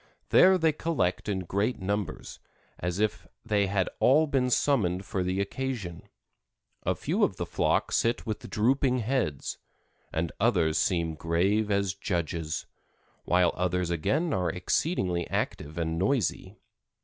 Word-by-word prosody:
There 190 0 +6
they 165 -2 +3
collect 140 - -1
in 95 -2 -1
great 100 +7 -1
numbers, 100 -3 -3 0.4
as 90 +1 -2
if 110 0 -1 0.2
they 100 -2 +2
had 95 -1 +1
all 150 +5 +5
been 135 -4 +1
summoned 100 -9 +1
for 95 - -2
the 90 +1 -1
occasion; 100 -5 -4 0.7
a - - 0
few - - 0
of - - +2
the - - -3
flock - - 0
sit 115 +1 +1
with 110 -2 -5
drooping 130 +4 +2
heads, 115 - -2 0.5
and 80 0 -1
others 85 -8 +2
seem 85 -2 +1
grave 95 +7 +1
as 100 -2 +1
judges, 85 -4 -3 0.6
while 90 -1 +3
others 90 -1 -1
again 145 - 0
are 90 -3 0
exceedingly 90 - -1
active 75 +2 -3
and 80 -1 -1
noisy. 105 - 0
95 Hz, 135 wpm, -28 LUFS, 85-120 Hz, 0.7 s, There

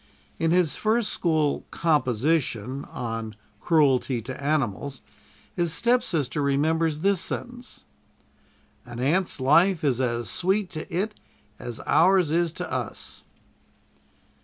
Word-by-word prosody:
In 165 - +1
his 175 -3 +2
first 220 +1 +1
school 155 -4 0
"composition," 140 -4 0
on 115 -3 -5 0.2
"Cruelty 135 -5 +2
to 130 +3 -7
Animals," 140 -2 -1 0.5
his 170 -2 0
stepsister 180 - +1
remembers 155 +3 +1
this 195 -1 +2
sentence: 245 +5 -6 1.0
"An 120 - -9
ant's 160 +6 +1
life 165 +7 +4
is 130 -4 +1
as 120 -2 -1
sweet 190 +1 -1
to 155 -2 -6
it 200 +6 -1 0.5
as 120 -2 -7
ours 175 0 +4
is 170 0 +1
to - - -6
us." - - -5
155 Hz, 110 wpm, -25 LUFS, 130-180 Hz, 1.0 s, life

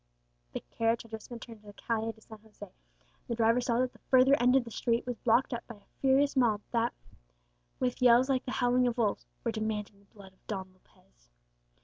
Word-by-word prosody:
The - - -4
carriage 230 0 -1
had 230 - -18
just 220 -1 -8
been 240 -1 -7
turned 230 -1 -11
into 210 0 -21
the 205 - -10
Calle 225 +1 -2
de 220 - -21
San 220 0 -13
José, 215 -1 -24
and - - -38
the 235 - -2
driver 230 +2 +3
saw 235 -1 0
that 255 0 0
the - - -20
further 260 +1 +4
end 250 +1 +4
of 265 - +4
the 230 - -10
street 235 +1 0
was 245 -1 -3
blocked 240 +3 +2
up 235 - -3
by 235 - -9
a 205 - -27
furious 275 +2 +3
mob 230 -5 +2
that, 235 0 +1 0.9
with 250 -1 -1
yells 245 +1 +6
like 265 -2 0
the 250 - -4
howling 250 0 +2
of 240 0 -2
wolves, 215 -4 0 0.2
were 230 - 0
demanding 215 -2 -4
the 200 - -25
blood 195 -2 -14
of - - -35
Don 190 -3 -5
Lopez. - - -30
230 Hz, 230 wpm, -30 LUFS, 215-250 Hz, 0.9 s, yells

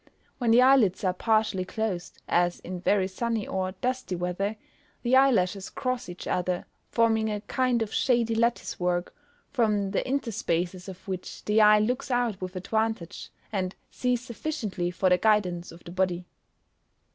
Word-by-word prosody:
When 240 -3 +1
the 240 +2 +7
eyelids 250 -9 +4
are 185 -1 +2
partially 215 -1 +1
closed, 185 -2 -4
as 175 0 +2
in 180 0 -6
very 190 0 +2
sunny 225 +2 -2
or 185 0 -2
dusty 255 -6 -1
weather, 180 +4 -2 0.5
the 245 +1 +3
eyelashes 205 -8 +3
cross 255 -5 -3
each 175 - -8
other, 180 0 -1 0.2
forming 225 -1 +2
a 210 -1 -2
kind 250 +1 +1
of 215 - -7
shady 235 -3 +2
lattice 235 +1 0
work, 180 0 0 0.4
from 210 -6 +1
the - - +1
interspaces 185 -8 -2
of 190 +1 -11
which 185 -1 -6
the 210 +1 +4
eye 210 0 +7
looks 245 +5 0
out 245 -6 0
with 185 0 -5
advantage, 220 -1 -2 0.2
and 190 -3 -2 0.2
sees 250 -1 0
sufficiently 230 - -3
for 180 +2 0
the 180 0 +4
guidance 185 -5 +1
of 165 +1 -14
the 170 - -9
body. 180 -1 0
210 Hz, 155 wpm, -27 LUFS, 185-235 Hz, 0.5 s, the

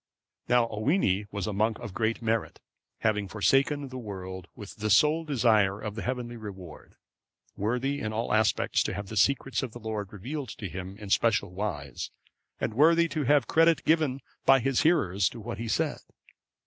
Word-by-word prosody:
Now 120 -1 +4
Owini 110 - +1
was 100 -3 -3
a 105 - -3
monk 110 +2 +1
of 110 -6 -8
great 115 +3 -1
merit, 115 0 -1 0.4
having 105 -3 +1
forsaken 135 +7 +1
the 130 0 -6
world 95 -4 -7
with 105 -3 -10
the 110 0 -2
sole 150 +10 +4
desire 110 -8 +2
of 105 -2 -5
the 110 - -5
heavenly 125 -2 -4
reward; 95 -7 -10 0.6
worthy 125 +7 -1
in 110 - -3
all 110 +2 -2
respects 110 0 +2
to - - -2
have 100 -1 -6
the 110 - -6
secrets 135 +5 +2
of 130 -5 -5
the 120 - -8
Lord 110 -3 -4
revealed 130 +6 -5
to 100 - -5
him 95 +2 -7
in 105 -2 -8
special 110 -5 +2
wise, 85 - -4 0.5
and - - -2
worthy 165 +6 +5
to 150 -1 -2
have 145 -1 +4
credit 165 +2 +3
given 155 -5 +2 0.2
by 135 0 +6
his 135 +1 +1
hearers 100 - +2
to 120 - -10
what 110 0 -6
he 115 - -4
said. - - 0
110 Hz, 180 wpm, -28 LUFS, 100-135 Hz, 0.6 s, by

